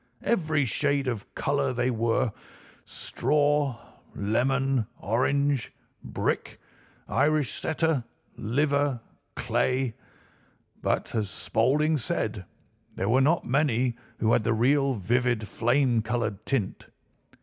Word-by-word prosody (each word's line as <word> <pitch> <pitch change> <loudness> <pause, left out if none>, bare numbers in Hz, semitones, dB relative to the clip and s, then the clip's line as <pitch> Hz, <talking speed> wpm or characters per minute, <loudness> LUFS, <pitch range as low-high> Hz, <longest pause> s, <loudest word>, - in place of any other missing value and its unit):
Every 155 -10 +1
shade 140 +2 +1
of 115 -5 -4
colour 140 -2 0
they 125 +1 0
were—straw, 135 +4 -1 0.4
lemon, 130 +3 +1
orange, 140 +4 0 0.3
brick, - - -2 0.5
Irish 150 -3 +2
setter, 160 -4 0 0.3
liver, 140 +2 +1 0.4
clay; 130 -2 0 0.9
but, - - -1
as 105 -4 -1
Spaulding 150 +11 +1
said, 110 -4 -2 0.5
there 95 - -1
were 130 +3 +4
not 160 +5 +2
many 130 -3 +1 0.2
who 110 0 +2
had 110 - +3
the 115 - +1
real 135 +4 +2
vivid 120 +2 0
flame 120 +1 +2
coloured 110 -3 -3
tint. 115 -8 -2
130 Hz, 100 wpm, -27 LUFS, 115-145 Hz, 0.9 s, were